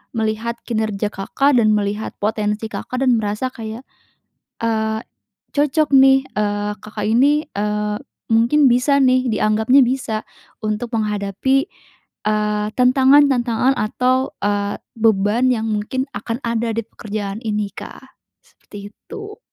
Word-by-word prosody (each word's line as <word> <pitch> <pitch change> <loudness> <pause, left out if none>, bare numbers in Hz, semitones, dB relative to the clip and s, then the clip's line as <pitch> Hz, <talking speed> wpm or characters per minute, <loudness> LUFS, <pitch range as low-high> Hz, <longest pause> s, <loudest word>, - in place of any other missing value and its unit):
melihat 225 +1 -2
kinerja 215 -3 -1
Kakak 275 +8 +1
dan 215 -1 +3
melihat 210 +1 -2
potensi 210 +1 -1
Kakak 255 +1 -4
dan 245 -3 +3
merasa 210 +4 -2
kayak, 225 +1 -7 0.8
eee, 220 -1 0 0.6
cocok 295 +1 +2
nih, 270 0 +6 0.2
eee, 205 0 -1
Kakak 215 0 -5
ini, 285 +7 +3
eee, 210 0 -2 0.4
mungkin 240 +6 +4
bisa 250 +4 +3
nih, 255 -1 +3
dianggapnya 220 +5 +3
bisa 240 -4 -2 0.4
untuk 215 +3 -2
menghadapi, 210 +5 0 0.6
eee, 210 0 0
tantangan-tantangan 260 -1 +4
atau, 255 +4 0
eee, 205 0 0 0.2
beban 220 +3 +2
yang 220 -2 -3
mungkin 215 +5 -2
akan 230 +2 -4
ada 235 0 -1
dipekerjaan 215 -2 -5
ini, 210 -2 -1
Kak, - - -9 0.4
seperti 205 0 -12
itu. 425 - -10
225 Hz, 115 wpm, -19 LUFS, 210-255 Hz, 0.8 s, nih